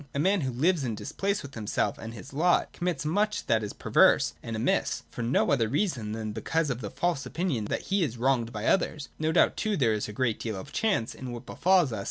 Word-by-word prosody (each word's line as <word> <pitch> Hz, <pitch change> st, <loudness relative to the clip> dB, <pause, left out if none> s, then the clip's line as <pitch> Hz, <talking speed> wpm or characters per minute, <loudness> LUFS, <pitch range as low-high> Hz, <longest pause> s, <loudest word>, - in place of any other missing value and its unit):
A -, -, 0 dB
man 190 Hz, +4 st, +3 dB
who 130 Hz, -2 st, -1 dB
lives 155 Hz, +6 st, +2 dB
in 115 Hz, -4 st, -2 dB
dispeace 200 Hz, -, -2 dB
with 140 Hz, -1 st, -9 dB
himself 110 Hz, -1 st, -1 dB
and 115 Hz, +1 st, -7 dB
his 120 Hz, +6 st, -10 dB
lot, 175 Hz, +5 st, +2 dB
commits 175 Hz, -4 st, -2 dB
much 210 Hz, +7 st, 0 dB
that 110 Hz, -1 st, +2 dB
is 105 Hz, -, -4 dB
perverse -, -, +4 dB
and 115 Hz, -, -5 dB
amiss, 110 Hz, -, 0 dB
for -, -, -6 dB
no 120 Hz, +5 st, +2 dB
other 115 Hz, -6 st, +2 dB
reason 130 Hz, -, -1 dB
than 110 Hz, -1 st, -4 dB
because 150 Hz, +8 st, -1 dB
of 125 Hz, 0 st, -4 dB
the 105 Hz, -, -4 dB
false 170 Hz, -, -1 dB
opinion 160 Hz, -, -2 dB
that -, -, -2 dB
he 200 Hz, -, +3 dB
is 130 Hz, -8 st, -1 dB
wronged 120 Hz, -2 st, +1 dB
by 105 Hz, 0 st, -5 dB
others. 155 Hz, -6 st, +1 dB
No 155 Hz, +1 st, +1 dB
doubt 170 Hz, -, +3 dB
too 215 Hz, -2 st, 0 dB
there 115 Hz, -6 st, +3 dB
is 105 Hz, 0 st, -2 dB
a -, -, -4 dB
great 115 Hz, 0 st, 0 dB
deal 110 Hz, -3 st, -3 dB
of 95 Hz, -, -8 dB
chance 200 Hz, -, 0 dB
in 130 Hz, -2 st, -7 dB
what 120 Hz, -1 st, -7 dB
befalls 180 Hz, -8 st, +3 dB
us. 110 Hz, -, -3 dB
130 Hz, 240 wpm, -28 LUFS, 115-170 Hz, -, perverse